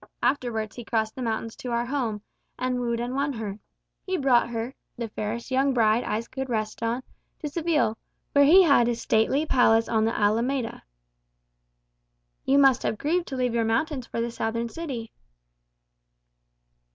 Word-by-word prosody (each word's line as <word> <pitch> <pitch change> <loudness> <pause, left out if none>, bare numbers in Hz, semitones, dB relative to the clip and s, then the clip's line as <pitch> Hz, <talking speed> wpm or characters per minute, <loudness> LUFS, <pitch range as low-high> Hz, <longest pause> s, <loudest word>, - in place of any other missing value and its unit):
Afterwards 240 -4 0
he 240 - -7
crossed 220 -1 -1
the 260 - -6
mountains 225 -1 -2
to 250 - -6
our 235 0 0
home, 240 -6 -2 0.3
and 255 0 -1
wooed 235 -1 -1
and 240 +1 -3
won 280 +1 0
her. 215 -3 -5 0.4
He 375 -1 -1
brought 255 -5 +3
her, 235 +2 -4 0.2
the 235 -1 -4
fairest 215 +4 -4
young 265 +1 +2
bride 225 0 +3
eyes 220 +2 -2
could 265 0 -5
rest 215 -2 -2
on, 230 +3 -1 0.3
to 305 - -5
Seville, 300 -8 0 0.3
where 285 - +6
he 365 +6 +8
had 280 -8 +5
a 240 - +1
stately 230 +6 +1
palace 230 -5 +4
on 220 -1 +2
the 225 - -1
Alameda." 230 +4 0 1.6
"You 275 - +4
must 270 -3 +5
have 220 - -1
grieved 340 +7 0
to 270 - -5
leave 250 -2 0
your 230 -1 +2
mountains 250 +4 -1
for - - -4
the 235 0 -2
southern 230 +1 -2
city." 250 -6 -6
240 Hz, 165 wpm, -26 LUFS, 225-270 Hz, 1.6 s, he